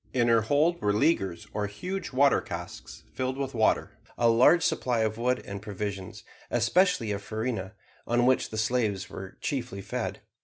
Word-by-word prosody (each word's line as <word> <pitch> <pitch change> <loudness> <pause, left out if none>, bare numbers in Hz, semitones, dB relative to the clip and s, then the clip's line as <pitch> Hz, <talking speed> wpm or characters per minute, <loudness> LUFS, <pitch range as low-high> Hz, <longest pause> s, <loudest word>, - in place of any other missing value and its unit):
In 120 -2 +2
her 115 -1 +5
hold 150 +9 +2
were 105 0 +2
leaguers 95 - +1
or 105 -1 -1
huge 180 - -5
water 140 +2 +4
casks - - -8
filled 130 0 -2
with 135 -1 -3
water; 110 -2 +2 0.3
a 120 - +4
large 125 +9 +5
supply 120 -3 +1
of 110 0 -1
wood 125 +1 0
and 100 0 -6
provisions, 100 -2 -5 0.3
especially 120 - +2
of 100 0 -3
farina, 110 -2 -3 0.3
on 120 +1 +2
which 130 0 +2
slaves 110 -3 -1
are 95 0 -8
chiefly 110 -8 -3
fed. - - -4
115 Hz, 160 wpm, -28 LUFS, 105-130 Hz, 0.3 s, her